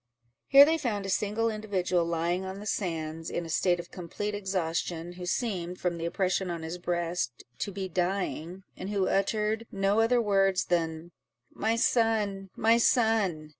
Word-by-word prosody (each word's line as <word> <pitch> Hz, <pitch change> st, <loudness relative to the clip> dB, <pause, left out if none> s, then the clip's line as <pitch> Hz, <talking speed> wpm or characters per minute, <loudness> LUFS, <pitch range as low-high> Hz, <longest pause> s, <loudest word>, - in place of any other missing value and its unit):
Here 275 Hz, +1 st, +9 dB
they 320 Hz, +2 st, +1 dB
found 210 Hz, -8 st, -2 dB
a -, -, -4 dB
single 215 Hz, +4 st, 0 dB
individual 185 Hz, -5 st, 0 dB
lying 170 Hz, +2 st, -1 dB
on 190 Hz, +1 st, -6 dB
the 210 Hz, -, -8 dB
sands, 165 Hz, -5 st, -3 dB
in 170 Hz, -, -3 dB
a -, -, -8 dB
state 175 Hz, +2 st, +2 dB
of 175 Hz, -, -8 dB
complete 200 Hz, +4 st, -4 dB
exhaustion, 175 Hz, -3 st, -2 dB
who 180 Hz, 0 st, -7 dB
seemed, 180 Hz, -5 st, -2 dB
from 175 Hz, -2 st, -1 dB
the 165 Hz, -, -2 dB
oppression 185 Hz, +1 st, 0 dB
on 170 Hz, -2 st, -4 dB
his 165 Hz, +2 st, -5 dB
breast, 175 Hz, -7 st, -2 dB, 0.2 s
to 200 Hz, -, -2 dB
be 190 Hz, 0 st, -4 dB
dying, 180 Hz, 0 st, -2 dB
and 190 Hz, -, -6 dB
who 200 Hz, -2 st, +1 dB
uttered 215 Hz, +3 st, 0 dB
no 195 Hz, +2 st, +1 dB
other 235 Hz, +2 st, +4 dB
words 195 Hz, -4 st, +2 dB
than, 165 Hz, -1 st, -1 dB, 0.4 s
"My 220 Hz, +2 st, 0 dB
son! 215 Hz, -5 st, +1 dB
my 230 Hz, +2 st, +4 dB
son!" 220 Hz, -, +2 dB
190 Hz, 170 wpm, -29 LUFS, 175-210 Hz, 0.4 s, Here